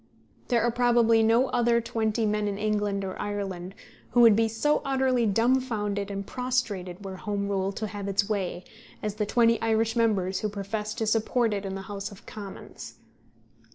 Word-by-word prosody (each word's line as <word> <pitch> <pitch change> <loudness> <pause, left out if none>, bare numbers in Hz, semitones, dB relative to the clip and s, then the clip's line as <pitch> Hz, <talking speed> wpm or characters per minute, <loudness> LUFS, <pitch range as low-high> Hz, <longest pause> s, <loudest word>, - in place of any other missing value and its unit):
There 235 -3 +2
are 240 - +2
probably 235 -2 +4
no 230 +4 +3
other 240 -1 +3
twenty 225 -1 -1
men 210 0 0
in 200 -1 -2
England 205 -2 -1
or 190 - -5
Ireland 195 -2 -4 0.4
who 245 - +5
would 230 -3 +8
be 225 +1 +3
so 225 +7 +1
utterly 260 -3 +1
dumfounded 215 -3 +1
and 200 0 -4
prostrated 210 -8 -2
were 190 -1 -6
Home 200 +1 -3
rule 195 -1 0
to 215 - -4
have 205 -1 -5
its 200 0 +1
way 190 -4 -2 0.4
as 210 -1 -1
the 210 0 -2
twenty 230 0 +3
Irish 225 0 +1
members 195 -5 +1
who 215 - -1
profess 210 +1 -4
to 225 - -1
support 225 +1 +1
it 200 -1 -3
in 190 - -4
the 195 - -6
House 200 +1 -6
of 200 - -14
Commons. 200 -3 -9
215 Hz, 180 wpm, -27 LUFS, 200-230 Hz, 0.4 s, would